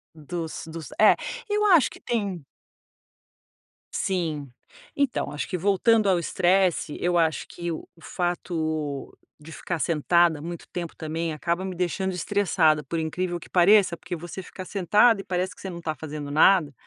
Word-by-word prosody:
Dos 160 Hz, +1 st, -5 dB
dos, 160 Hz, -4 st, -8 dB
é, 215 Hz, -, +7 dB, 0.3 s
eu 420 Hz, 0 st, +1 dB
acho 345 Hz, -8 st, +5 dB
que -, -, -12 dB
tem 200 Hz, -, -3 dB, 1.5 s
sim. 160 Hz, -7 st, -2 dB, 0.5 s
Então, 280 Hz, -3 st, 0 dB, 0.2 s
que 180 Hz, -, -2 dB
voltando 200 Hz, +3 st, +3 dB
ao 180 Hz, -2 st, +3 dB
estresse, 180 Hz, -2 st, +1 dB
eu 175 Hz, 0 st, +1 dB
acho 160 Hz, -2 st, +1 dB
que 170 Hz, -1 st, -5 dB
o 160 Hz, -, -6 dB
fato 160 Hz, -5 st, -3 dB, 0.2 s
de 155 Hz, +2 st, -12 dB
ficar 175 Hz, 0 st, -4 dB
sentada 165 Hz, 0 st, +2 dB
muito 170 Hz, +1 st, -7 dB
tempo 175 Hz, -2 st, -6 dB
também 160 Hz, +1 st, -3 dB
acaba 170 Hz, +4 st, -2 dB
me 190 Hz, -1 st, -4 dB
deixando 185 Hz, +2 st, -1 dB
estressada, 175 Hz, -5 st, +2 dB
por 165 Hz, +4 st, -3 dB
incrível 175 Hz, +2 st, -2 dB
que -, -, -14 dB
pareça, 185 Hz, 0 st, +5 dB
porque 175 Hz, +1 st, -6 dB
você 175 Hz, +3 st, -7 dB
fica 185 Hz, 0 st, -9 dB
sentada 205 Hz, +3 st, +3 dB
e -, -, -13 dB
parece 180 Hz, 0 st, -2 dB
que -, -, -15 dB
você 190 Hz, -, -5 dB
não 170 Hz, -1 st, -7 dB
tá 155 Hz, -1 st, -3 dB
fazendo 150 Hz, -2 st, -6 dB
nada. 155 Hz, -1 st, +4 dB
175 Hz, 155 wpm, -25 LUFS, 160-190 Hz, 1.5 s, é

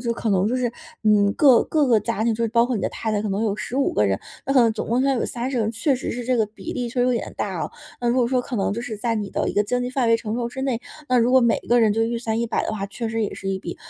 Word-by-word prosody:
就 235 Hz, -1 st, -1 dB
可 230 Hz, -2 st, -2 dB
能 195 Hz, +2 st, +2 dB
就 250 Hz, -, 0 dB
是， 245 Hz, -2 st, -1 dB, 0.3 s
嗯， 205 Hz, -1 st, +4 dB
各 265 Hz, -5 st, +6 dB
各 300 Hz, -3 st, +1 dB
个 230 Hz, -4 st, +4 dB
家 220 Hz, +1 st, -2 dB
庭， 230 Hz, -, +2 dB
就 230 Hz, -, -3 dB
是 230 Hz, -, +1 dB
包 235 Hz, +1 st, +3 dB
括 250 Hz, 0 st, -1 dB
你 210 Hz, -, -1 dB
的 -, -, 0 dB
太 220 Hz, -1 st, -3 dB
太， 210 Hz, -, +1 dB
可 215 Hz, -, -3 dB
能 200 Hz, +3 st, -1 dB
有 205 Hz, -2 st, 0 dB
15 265 Hz, +6 st, -1 dB
个 105 Hz, -, +2 dB
人， 95 Hz, 0 st, 0 dB, 0.3 s
那 275 Hz, -, 0 dB
可 255 Hz, -, +7 dB
能 225 Hz, -1 st, +3 dB
总 215 Hz, -, -5 dB
共 240 Hz, +3 st, +2 dB
要 275 Hz, 0 st, +2 dB
有 -, -, -1 dB
30 250 Hz, +2 st, -3 dB
个 225 Hz, -, +2 dB
人， 215 Hz, -, 0 dB
确 235 Hz, +5 st, +1 dB
实 255 Hz, -, -4 dB
是 245 Hz, 0 st, -4 dB
这 255 Hz, -, +1 dB
个 220 Hz, -, +2 dB
比 210 Hz, -2 st, -8 dB
例 245 Hz, -1 st, -3 dB
确 245 Hz, +2 st, -5 dB
实 245 Hz, -, +3 dB
有 250 Hz, -, +2 dB
点 235 Hz, -, -3 dB
大 -, -, -3 dB
哦。 -, -, -4 dB, 0.3 s
那 240 Hz, -, 0 dB
如 240 Hz, -, +2 dB
果 245 Hz, -, +3 dB
说 250 Hz, +1 st, +1 dB
可 245 Hz, -1 st, -5 dB
能 200 Hz, 0 st, 0 dB
就 230 Hz, -, -3 dB
是 235 Hz, -3 st, -5 dB
在 230 Hz, +2 st, -1 dB
你 210 Hz, -2 st, -3 dB
的 -, -, -1 dB
一 -, -, -6 dB
个 205 Hz, -, +2 dB
经 245 Hz, +4 st, -1 dB
济 245 Hz, -, -3 dB
范 255 Hz, -2 st, 0 dB
围 230 Hz, -, +5 dB
承 220 Hz, -1 st, -4 dB
受 235 Hz, 0 st, -2 dB
之 265 Hz, +2 st, -6 dB
内， 260 Hz, -4 st, 0 dB, 0.3 s
那 255 Hz, -1 st, +3 dB
如 235 Hz, +2 st, +3 dB
果 260 Hz, -, +7 dB
每 235 Hz, -2 st, +3 dB
个 240 Hz, 0 st, +5 dB
人 215 Hz, -2 st, +4 dB
就 225 Hz, -, +1 dB
预 235 Hz, 0 st, -2 dB
算 225 Hz, -1 st, -2 dB
100 235 Hz, -1 st, 0 dB
的 -, -, -2 dB
话， 200 Hz, -2 st, -3 dB
确 230 Hz, +3 st, -5 dB
实 225 Hz, 0 st, -1 dB
也 -, -, -4 dB
是 195 Hz, -, -6 dB
一 190 Hz, -, -1 dB
笔 175 Hz, -2 st, -7 dB
230 Hz, 365 characters per minute, -23 LUFS, 215-245 Hz, 0.3 s, 可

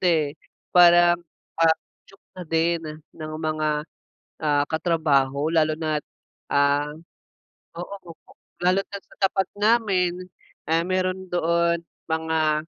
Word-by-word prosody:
eh, 160 Hz, -5 st, +2 dB, 0.4 s
parang, 175 Hz, -1 st, +6 dB, 0.4 s
ah, 160 Hz, -1 st, +5 dB, 0.3 s
cho -, -, -18 dB, 0.2 s
na 185 Hz, -, -10 dB
din 165 Hz, +1 st, +1 dB, 0.3 s
ng 155 Hz, -1 st, -7 dB
mga, 155 Hz, -1 st, -1 dB, 0.6 s
ah, 145 Hz, -2 st, +2 dB
katrabaho 150 Hz, -4 st, +1 dB
lalo 155 Hz, -1 st, +2 dB
na 155 Hz, -2 st, -1 dB
at, -, -, -59 dB, 0.5 s
ah, 145 Hz, +1 st, +2 dB, 0.9 s
oo 180 Hz, +3 st, -6 dB, 0.6 s
lalo 185 Hz, +2 st, +2 dB
na 200 Hz, -, -10 dB
at -, -, -40 dB
sa -, -, -19 dB
tapat 195 Hz, 0 st, +2 dB
namin, 195 Hz, -5 st, +1 dB, 0.4 s
eh, 165 Hz, +1 st, +2 dB
meron 185 Hz, 0 st, -2 dB
doon 170 Hz, 0 st, +1 dB, 0.3 s
mga. 160 Hz, -1 st, 0 dB
165 Hz, 120 wpm, -24 LUFS, 155-180 Hz, 0.9 s, parang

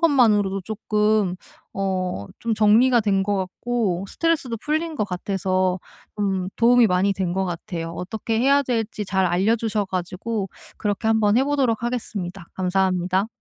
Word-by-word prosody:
것만으로도 210 Hz, -, +3 dB
쪼끔 210 Hz, -2 st, 0 dB, 0.4 s
어 185 Hz, -, -2 dB
좀 230 Hz, -1 st, 0 dB
정리가 225 Hz, +4 st, +5 dB
된 200 Hz, -3 st, +1 dB
것 205 Hz, +1 st, 0 dB
같고 195 Hz, 0 st, -2 dB
스트레스도 315 Hz, -7 st, 0 dB
풀린 315 Hz, +6 st, -2 dB
것 210 Hz, -, 0 dB
같아서 185 Hz, -1 st, -1 dB, 0.4 s
좀 195 Hz, -3 st, -1 dB
도움이 240 Hz, 0 st, +5 dB
많이 185 Hz, +2 st, +2 dB
된 185 Hz, -2 st, -2 dB
것 190 Hz, +1 st, 0 dB
같아요. 170 Hz, -1 st, -5 dB
어떻게 195 Hz, +6 st, -3 dB
해야 280 Hz, +3 st, +4 dB
될지 225 Hz, -4 st, -2 dB
잘 190 Hz, -1 st, +1 dB
알려주셔 210 Hz, +4 st, +1 dB
가지고 190 Hz, +3 st, -3 dB, 0.3 s
그렇게 210 Hz, +1 st, -2 dB
한번 220 Hz, -1 st, +3 dB
해 265 Hz, -, +4 dB
보도록 270 Hz, -6 st, +1 dB
하겠습니다. 195 Hz, -7 st, -4 dB
감사합니다. 185 Hz, +1 st, +1 dB
205 Hz, 320 characters per minute, -23 LUFS, 185-230 Hz, 0.4 s, 정리가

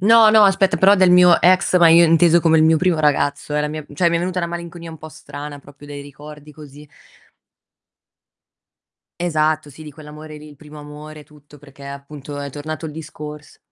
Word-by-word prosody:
No, 220 Hz, +2 st, +5 dB
no, 215 Hz, -1 st, +5 dB
aspetta, 195 Hz, 0 st, 0 dB
però 195 Hz, +2 st, +5 dB
del 185 Hz, -2 st, +3 dB
mio 180 Hz, -1 st, +5 dB
ex, 185 Hz, 0 st, +2 dB
ma 170 Hz, -2 st, +5 dB
io 170 Hz, +1 st, +5 dB
inteso 170 Hz, +1 st, +3 dB
come 160 Hz, -1 st, +2 dB
il 155 Hz, -, +3 dB
mio 160 Hz, 0 st, +3 dB
primo 180 Hz, -3 st, 0 dB
ragazzo, 150 Hz, 0 st, -1 dB
eh, 150 Hz, -, 0 dB
la 150 Hz, -, -3 dB
mia 155 Hz, 0 st, -7 dB
cioè 170 Hz, +4 st, 0 dB
mi 170 Hz, -, -1 dB
è -, -, -1 dB
venuta 180 Hz, +1 st, -4 dB
una 170 Hz, -, -3 dB
malinconia 170 Hz, 0 st, -9 dB
un 160 Hz, -, -11 dB
po' 155 Hz, 0 st, -12 dB
strana, 145 Hz, 0 st, -10 dB
proprio 145 Hz, +1 st, -17 dB
dei 145 Hz, -1 st, -9 dB
ricordi 150 Hz, +1 st, -14 dB
così. 150 Hz, 0 st, -15 dB, 2.3 s
Esatto, 155 Hz, -3 st, -2 dB
sì, 155 Hz, +3 st, -14 dB
di 150 Hz, -, -11 dB
quell'amore 150 Hz, +1 st, -13 dB
lì, 150 Hz, 0 st, -14 dB
il 145 Hz, -, -17 dB
primo 150 Hz, +1 st, -15 dB
amore, 150 Hz, +1 st, -12 dB
tutto, 150 Hz, -1 st, -20 dB
perché 140 Hz, 0 st, -17 dB
appunto 140 Hz, +1 st, -10 dB
è 140 Hz, -1 st, -7 dB
tornato 155 Hz, +2 st, -7 dB
il 150 Hz, -, -9 dB
discors 150 Hz, -1 st, -11 dB
155 Hz, 200 wpm, -18 LUFS, 150-170 Hz, 2.3 s, No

